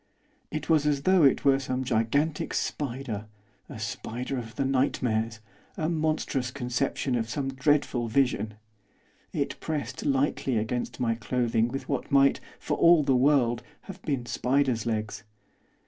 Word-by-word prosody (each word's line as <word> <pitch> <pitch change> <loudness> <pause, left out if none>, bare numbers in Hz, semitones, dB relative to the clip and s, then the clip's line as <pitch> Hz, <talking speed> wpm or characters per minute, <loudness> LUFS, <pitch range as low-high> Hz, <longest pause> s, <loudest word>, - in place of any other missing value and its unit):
It 155 -1 -4
was 155 -3 +3
as 140 -2 +1
though 185 0 +4
it 140 -2 +4
were 135 -1 +5
some 130 -1 -2
gigantic 135 +6 0
spider, 120 -6 -3 0.4
a - - -8
spider 110 +4 -4
of 115 -1 -9
the 135 - 0
nightmares; 115 -4 0 0.4
a 155 0 0
monstrous 155 -5 0
conception 130 0 -2
of 115 -2 -1
some 135 +3 -2
dreadful 135 -3 +1
vision. 110 -4 +1 0.8
It - - -2
pressed 140 -5 -4
lightly 135 -2 +1
against 115 +3 -2
my 115 -2 +1
clothing 115 -1 0
with 135 +3 -5
what 140 -3 -3
might, 140 0 +5 0.2
for - - -2
all 170 -2 +6
the 135 -2 +3
world, 125 -3 +3 0.2
have 195 -1 -10
been 135 -8 -2
spider's 125 0 0
legs. 110 -1 -2
130 Hz, 145 wpm, -27 LUFS, 115-140 Hz, 0.8 s, all